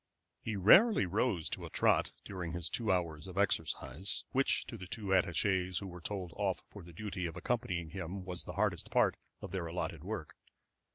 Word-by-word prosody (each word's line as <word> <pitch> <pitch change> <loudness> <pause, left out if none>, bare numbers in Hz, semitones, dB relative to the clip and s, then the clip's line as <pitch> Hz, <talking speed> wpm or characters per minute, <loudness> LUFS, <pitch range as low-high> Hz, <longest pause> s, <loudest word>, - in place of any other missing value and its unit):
He 110 - -3
rarely 175 - +7
rose 95 -2 0
to - - -1
a - - -6
trot - - +3
during 90 -4 -5
his 85 -1 0
two 110 -4 +1
hours 85 -3 -1
of 95 0 -9
exercise, 80 -3 -1
which 135 +1 +2
to - - -7
the 95 -5 -8
two 100 +1 -3
attaché's 95 0 +2
who 100 - -2
were 90 -2 -8
told 90 -2 -4
off 100 -3 -1
for 100 - -11
the 85 0 -12
duty 95 0 -4
of 80 - -7
accompanying 90 -6 -1
him 95 +1 -5
was 90 -2 -3
the 90 - -6
hardest 100 -2 0
part - - +3 0.3
of - - -6
their 90 -3 -2
allotted 85 -2 -3
work. 95 -5 -5
95 Hz, 190 wpm, -34 LUFS, 85-100 Hz, 0.3 s, rarely